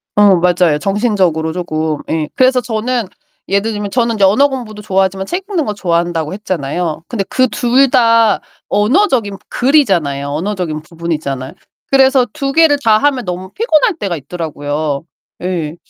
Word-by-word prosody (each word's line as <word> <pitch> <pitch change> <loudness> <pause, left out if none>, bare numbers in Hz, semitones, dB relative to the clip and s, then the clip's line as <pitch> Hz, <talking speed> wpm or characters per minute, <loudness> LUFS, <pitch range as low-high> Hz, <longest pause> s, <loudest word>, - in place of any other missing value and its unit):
어 205 -2 +6
맞아요. 175 -3 +2
정신적으로 190 -6 0
쪼금. 155 -4 -2
예. 155 -2 -1
그래서 255 0 +4
저는 230 +1 -2 0.4
예를 200 +3 0
들면 205 -1 -4
저는 235 -2 +1
이제 200 - +3
언어 265 +9 +4
공부도 220 -5 -6
좋아하지만 190 -1 0
책 370 - -4
읽는 340 -7 0
거 210 - -2
좋아한다고 170 -3 -1
했잖아요. 170 -4 -3
근데 215 -5 -2
그 255 0 +2
둘 250 +4 +2
다 230 -3 +3 0.3
언어적인 220 - +1
글이잖아요. 190 - +1
언어적인 165 -1 -3
부분이잖아요. 155 -5 -4 0.4
그래서 265 -1 +4
2 275 0 -2
개를 315 -1 +4
다 220 -1 +5
하면 265 +1 +1
너무 185 +1 -5
피곤할 395 -4 +2
때가 185 - -3
있더라고요. 145 -1 -4 0.3
네. 170 -4 -3
195 Hz, 350 characters per minute, -15 LUFS, 165-245 Hz, 0.4 s, 어